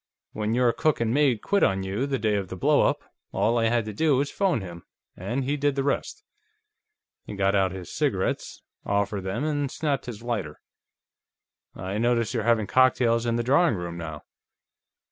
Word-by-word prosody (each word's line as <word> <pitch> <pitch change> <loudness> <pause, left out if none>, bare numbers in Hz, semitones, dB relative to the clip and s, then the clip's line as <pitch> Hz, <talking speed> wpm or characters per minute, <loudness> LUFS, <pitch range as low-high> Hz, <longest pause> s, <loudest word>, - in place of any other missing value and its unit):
"When 110 +1 -1
your 125 -1 +3
cook 155 -2 +1
and 115 -1 0
maid 135 -6 +2
quit 200 0 +1
on 95 0 +2
you, 100 +8 -2
the 135 -1 -1
day 110 -2 0
of 100 -2 -1
the 95 - -7
blow 90 - +3
up, - - +1 0.3
all 115 +2 +1
I 115 - +2
had 115 0 +1
to 110 - -5
do 150 +4 +2
was 140 +2 0
phone 190 - +1
him, 85 -3 -9 0.3
and 130 +3 -3
he 140 +3 -1
did 145 -1 +1
the 135 - 0
rest." 140 - -2 1.0
He 105 - -6
got 100 0 +1
out 95 -2 +2
his 95 -2 -8
cigarettes, - - -2 0.2
offered 100 0 -1
them, 95 +9 -2
and 145 -2 -1
snapped 145 -2 -2
his 115 -2 -7
lighter. 105 -11 -3 1.2
"I 95 +3 -4
notice 120 0 +1
you're 115 - 0
having 110 -1 +2
cocktails 120 -1 +3
in 115 - +1
the 120 - 0
drawing 140 +3 +3
room 85 -2 -5
now." 80 -3 -7
115 Hz, 190 wpm, -26 LUFS, 100-135 Hz, 1.2 s, your